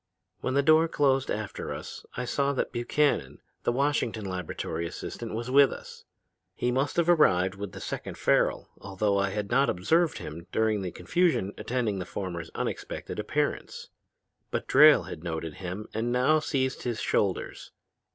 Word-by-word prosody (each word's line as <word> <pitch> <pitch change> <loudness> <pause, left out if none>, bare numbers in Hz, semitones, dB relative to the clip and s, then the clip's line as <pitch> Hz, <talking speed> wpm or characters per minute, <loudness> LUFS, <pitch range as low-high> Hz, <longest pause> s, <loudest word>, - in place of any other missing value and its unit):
When 130 - -2
the 140 - +3
door 155 +2 +5
closed 135 -4 +2
after 105 -2 -4
us - - -7
I 125 - -2
saw 140 +3 0
that 130 - -1
Buchannon, 120 - 0 0.2
the - - +1
Washington 125 -5 0
laboratory 90 -3 -4
assistant, 115 +6 -6
was 120 +3 -4
with 140 0 +6
us. - - -10 0.5
He 125 - 0
must 135 +3 0
have 170 -1 +3
arrived 95 - +4
with 100 -1 -7
the - - -8
second - - -5
Farrel, - - +2
although 100 +1 0
I 95 0 +1
had 100 0 -4
not 140 +1 +4
observed 160 - +2
him 85 +1 -8
during 110 -2 +1
the 95 - -3
confusion 165 - 0
attending 115 -6 -2
the 90 - -4
former's 85 -4 -5
unexpected - - -4
appearance. 145 +7 -2 0.6
But - - -3
Drayle - - +7
had 80 - -8
noted 80 -2 -4
him 95 +4 -5
and 115 +2 -1
now 130 +6 +3
seized 130 -3 -1
his 120 -3 -3
shoulders. 100 -3 -1
110 Hz, 160 wpm, -28 LUFS, 95-140 Hz, 0.6 s, Drayle